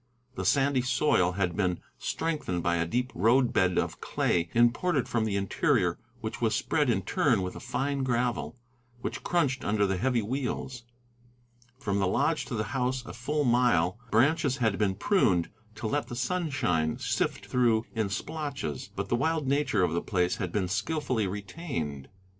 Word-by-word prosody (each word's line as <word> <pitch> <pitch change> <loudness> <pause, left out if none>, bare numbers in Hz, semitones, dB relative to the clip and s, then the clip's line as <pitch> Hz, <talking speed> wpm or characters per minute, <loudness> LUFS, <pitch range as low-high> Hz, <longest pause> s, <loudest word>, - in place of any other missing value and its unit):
The - - -4
sandy 140 -2 +3
soil 125 -8 +2
had 90 -2 -1
been 90 -4 0 0.2
strengthened 150 - -2
by 85 0 +2
a 85 0 0
deep 125 +7 -1
road 120 +6 +3
bed 90 -1 +2
of - - -1
clay 85 0 0
imported 125 +6 +3
from 115 -2 0
the 105 -2 -1
interior, 100 - +1 0.2
which 110 0 -5
was 110 -1 +2
spread 145 +3 +1
in 95 -5 +1
turn 115 0 +2
with 90 - -4
a - - -6
fine 140 +1 -2
gravel, 125 -1 -1 0.4
which - - -4
crunched 145 -6 +1
under 105 -1 +2
the 95 -1 0
heavy 120 +1 +1
wheels. 125 0 -3 0.9
From 100 -7 -1
the 95 - +2
lodge 150 - +1
to 125 - -4
the 105 - 0
house, 130 -1 -1
a 110 - -8
full 145 +5 -1
mile, 120 - +3
branches 135 +4 +3
had 110 -6 +1
been 100 -3 +1
pruned 95 - +2 0.2
to 110 - -7
let 145 +7 0
the 120 - -6
sunshine 130 - 0
sift - - -1
through 115 -3 +2
in 110 -4 -1
splotches, 140 - -4
but - - -3
the - - +1
wild 160 +2 0
nature 140 -8 +2
of 85 -2 +1
the 85 - 0
place 90 -3 0
had 90 -7 -3
been 95 -2 0
skilfully 110 - -1
retained. 95 - -5
120 Hz, 170 wpm, -28 LUFS, 95-135 Hz, 0.9 s, sandy